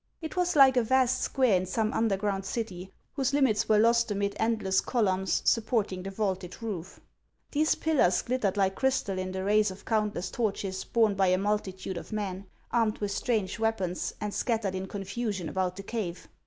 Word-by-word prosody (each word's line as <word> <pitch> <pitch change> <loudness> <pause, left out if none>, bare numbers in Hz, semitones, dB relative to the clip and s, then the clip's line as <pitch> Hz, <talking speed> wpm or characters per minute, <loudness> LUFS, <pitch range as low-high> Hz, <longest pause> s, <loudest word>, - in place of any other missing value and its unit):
It 320 0 -6
was 360 -1 +1
like 265 -3 +7
a - - +6
vast 255 +1 +2
square 255 -7 +2
in 185 0 0
some 215 +3 0
underground 200 -3 0
city, 190 -4 -5 0.2
whose 275 -1 0
limits 260 -8 +2
were 215 - +5
lost 235 +2 +4
amid 200 0 -1
endless 215 -4 +1
columns 190 -6 0
supporting 220 -5 +1
the 195 - -5
vaulted 190 -3 -3
roof. 190 -5 -5 0.5
These 310 +1 +2
pillars 290 - +2
glittered 225 -6 -1
like 190 -1 +2
crystal 255 -6 0
in 185 0 -3
the 190 0 -3
rays 210 +1 +3
of 185 +1 -10
countless 210 -5 -1
torches 200 -4 -2
borne 225 -3 +2
by 195 -1 +2
a 180 0 +3
multitude 190 -2 -2
of - - -8
men, 200 -2 -4 0.2
armed 225 -3 +1
with 205 -1 -3
strange 215 0 -1
weapons, 195 -6 -1
and 210 -1 -3
scattered 220 -6 -1
in 190 0 -4
confusion 200 -1 -4
about 185 0 -1
the 195 - -8
cave. 195 -5 -4
205 Hz, 180 wpm, -28 LUFS, 190-230 Hz, 0.5 s, like